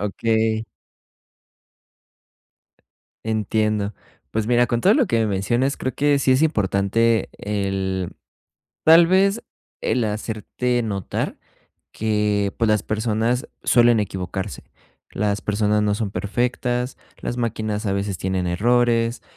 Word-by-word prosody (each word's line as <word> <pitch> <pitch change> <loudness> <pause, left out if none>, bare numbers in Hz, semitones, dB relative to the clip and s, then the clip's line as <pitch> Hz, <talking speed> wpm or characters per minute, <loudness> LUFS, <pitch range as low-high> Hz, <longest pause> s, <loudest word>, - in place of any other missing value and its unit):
Okey. 110 +1 0 2.6
Entiendo. 110 -1 0 0.4
Pues 110 -1 -1
mira, 120 +1 +3
con 120 +1 -1
todo 200 +4 +5
lo 270 -6 +3
que 115 - +1
me 110 - +2
mencionas, 120 +7 0
creo 130 - -3
que 145 -1 +2
sí 135 - +3
es 130 +4 +3
importante 110 - +1
el 95 -3 -2 0.7
tal 165 +1 +7
vez, 195 +4 +3 0.4
el 125 - +1
hacerte 110 +3 -2
notar 100 -4 -3 0.6
que, 105 -2 0
pues, 115 -2 +2
las 105 -1 +2
personas 110 +3 -1
suelen 120 -2 +4
equivocarse. 95 0 -4 0.5
Las 105 0 -1
personas 105 0 +1
no 105 -1 +1
son 105 -2 -2
perfectas, 125 +4 -2 0.2
las 120 - -3
máquinas 110 -2 -2
a 95 - 0
veces 100 -1 -2
tienen 95 -1 -1
errores. 115 +4 +1
110 Hz, 120 wpm, -22 LUFS, 100-120 Hz, 2.6 s, tal